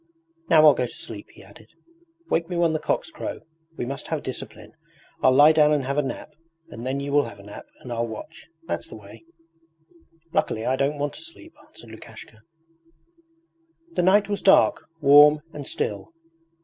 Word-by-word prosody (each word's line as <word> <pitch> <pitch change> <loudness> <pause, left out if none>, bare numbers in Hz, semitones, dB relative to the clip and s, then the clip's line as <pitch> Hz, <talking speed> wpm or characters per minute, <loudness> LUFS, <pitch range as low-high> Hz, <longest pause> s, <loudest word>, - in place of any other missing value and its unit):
'Now 155 -1 +6
I'll 150 - +8
go 125 -1 -2
to - - -12
sleep,' - - -9
he - - -17
added. - - -18 0.6
'Wake 165 - -1
me 180 - -4
when 170 -2 +2
the 155 - -1
cocks 325 - -2
crow. 310 -1 -6 0.4
We - - -3
must 140 +3 -6
have 160 -3 -3
discipline. 110 -4 -8 0.5
I'll 130 - +5
lie 145 +4 +7
down 150 -1 +4
and 150 -2 +1
have 140 +3 -1
a - - +3
nap, 135 - -7 0.4
and 120 +2 -7
then 135 +1 -2
you 140 0 -5
will 145 0 +3
have 115 - -10
a 100 - -14
nap 105 0 -11
and 125 - -7
I'll 115 0 -2
watch 115 +8 -10 0.2
that's - - -4
the - - -11
way.' 105 +3 -14 1.1
'Luckily 110 - -1
I 130 - +1
don't 140 +2 -1
want 145 0 -3
to - - -11
sleep,' 325 0 -13
answered 115 - -15
Lukashka. 110 0 -13 1.5
The - - 0
night 195 +3 +4
was 205 -1 -3
dark, 195 - +4
warm, 150 +1 +7
and 145 -2 -8
still. 100 -2 -3
140 Hz, 190 wpm, -24 LUFS, 120-160 Hz, 1.5 s, I'll